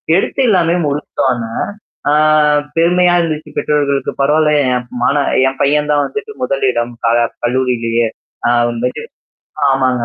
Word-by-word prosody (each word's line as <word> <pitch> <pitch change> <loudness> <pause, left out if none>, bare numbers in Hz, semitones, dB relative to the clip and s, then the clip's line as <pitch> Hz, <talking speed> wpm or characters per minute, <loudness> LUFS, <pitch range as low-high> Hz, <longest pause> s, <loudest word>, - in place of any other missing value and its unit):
எடுத்து 195 +7 0
எல்லாமே 175 -3 +2
முடித்தோன, 140 -3 -1 0.7
ஆ - - +3 0.6
பெருமையா 175 +1 +3
இருந்துச்சு 155 -2 -4
பெற்றவர்களுக்கு 140 -2 0
"பரவால்ல 150 +2 +3 0.2
என் 125 0 -3 0.2
மான 140 - +2 0.3
என் 135 - -10
பையன் 150 +1 +1
தான் 145 -1 +2
வந்துட்டு 430 0 -6
முதலிடம் 125 - 0 0.2
க - - +3 0.3
கல்லூரியிலேயே. 120 -2 0 0.4
அ - - +3 0.2
வந்துட்டு" 120 +2 -3 0.7
ஆமாங்க. 130 -3 +1
140 Hz, 120 wpm, -15 LUFS, 125-155 Hz, 0.7 s, ஆ